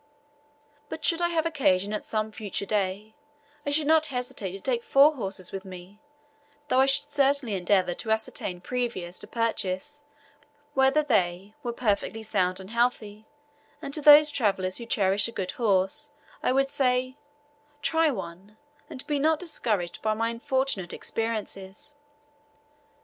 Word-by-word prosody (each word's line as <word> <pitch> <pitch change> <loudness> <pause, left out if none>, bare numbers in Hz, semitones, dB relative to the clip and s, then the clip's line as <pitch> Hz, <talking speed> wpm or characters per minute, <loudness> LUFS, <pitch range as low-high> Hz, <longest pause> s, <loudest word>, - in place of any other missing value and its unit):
But 310 - -5
should 335 +2 +2
I 345 - +3
have 330 -2 0
occasion 210 - +1
at 210 - -3
some 215 0 -2
future 205 -2 -4
day, 205 +1 -2 0.5
I - - +2
should 295 +1 +1
not 315 +1 +4
hesitate 250 -7 -4
to 195 - -6
take 240 +2 -1
four 285 +3 +5
horses 195 - -5
with 195 -1 -5
me, 185 +1 -11 0.7
though 255 - +3
I 265 - +5
should 270 - +2
certainly 275 -5 +1
endeavour 185 -1 +2
to 220 - -7
ascertain 220 -4 -2
previous 205 -6 -3
to - - -4
purchase 230 +4 -2 0.7
whether 270 +3 +3
they, 195 -6 0
were 240 - -3
perfectly 220 -2 -1
sound 185 -3 0
and 190 +2 -10
healthy, 220 -3 -1 0.5
and 275 - -7
to 305 - -1
those 295 +1 +8
travellers 195 -8 0
who 235 - -8
cherish 200 -1 +2
a - - -7
good 190 -5 -3
horse 215 +6 +1 0.3
I - - +1
would 275 +1 +2
say, 255 -2 +1 0.7
"Try 320 0 +3
one," 195 -3 -7 0.3
and 260 - -8
be 295 -1 -1
not 315 +2 +3
discouraged 215 - -2
by 215 0 0
my 230 +1 0
unfortunate 235 -5 -2
experiences. 225 +3 -5
225 Hz, 150 wpm, -27 LUFS, 195-275 Hz, 0.7 s, those